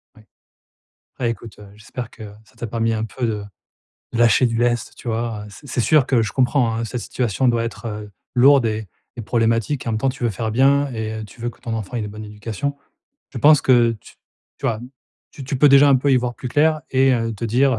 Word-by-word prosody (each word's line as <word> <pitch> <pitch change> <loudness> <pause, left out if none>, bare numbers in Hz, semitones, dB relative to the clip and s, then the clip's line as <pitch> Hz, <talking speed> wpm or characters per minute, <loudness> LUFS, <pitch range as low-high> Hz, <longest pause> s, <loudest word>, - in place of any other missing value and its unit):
Oui, 110 - -18 1.0
bah 125 - 0
écoute, 115 -1 -6
heu, 105 -1 -13
j'espère 115 +3 -8
que, - - -13
heu, 105 -1 -9
ça - - -25
t'a 120 - -5
permis 115 0 -1
un 110 0 -1
peu 120 +2 -3
de 105 -2 -3 0.7
lâcher 120 +2 +5
du 115 -1 -1
lest, 120 0 0
tu 125 - -8
vois? 115 -2 -2
Heu, - - -11
c'est 125 +8 -14
c'est 125 - -2
sûr 145 +2 +4
que 125 -4 +2
je 105 - -3
comprends, 125 -3 +2
hein, 115 - -2
cette 115 +2 -4
situation 125 +2 -1
doit 115 -1 +1
être, 115 +1 -6
heu, 105 -1 -6 0.2
lourde 135 0 +6
et 110 -1 -2 0.3
et - - -5
problématique. 115 +4 0
En - - 0
même 110 - 0
temps 135 - +1
tu 130 0 -10
veux 120 - +2
faire 110 +2 -3
bien 140 +4 +4
et 110 -1 -4
tu 105 - -17
veux 120 +1 -2
que - - -21
ton 115 - -4
enfant 110 +2 -4
ait - - -1
une 105 - -3
bonne 105 +1 -8
éducation. 110 +6 -4 0.6
Je 125 - -5
pense 150 +4 +6
que 120 -3 +4
tu - - -16 0.4
tu - - -3
vois, 110 -2 -1 0.5
tu 140 - -10
tu 135 +1 -2
peux 145 +3 +6
déjà 140 +1 +7
un 140 - +6
peu 135 +2 +1
y - - +5
voir 125 -1 -1
plus 130 - -6
clair 155 +4 +2
et 135 0 +4
heu, 115 -1 -1
te 110 +2 -6
dire: 125 +2 +2
120 Hz, 245 wpm, -21 LUFS, 110-130 Hz, 1.0 s, déjà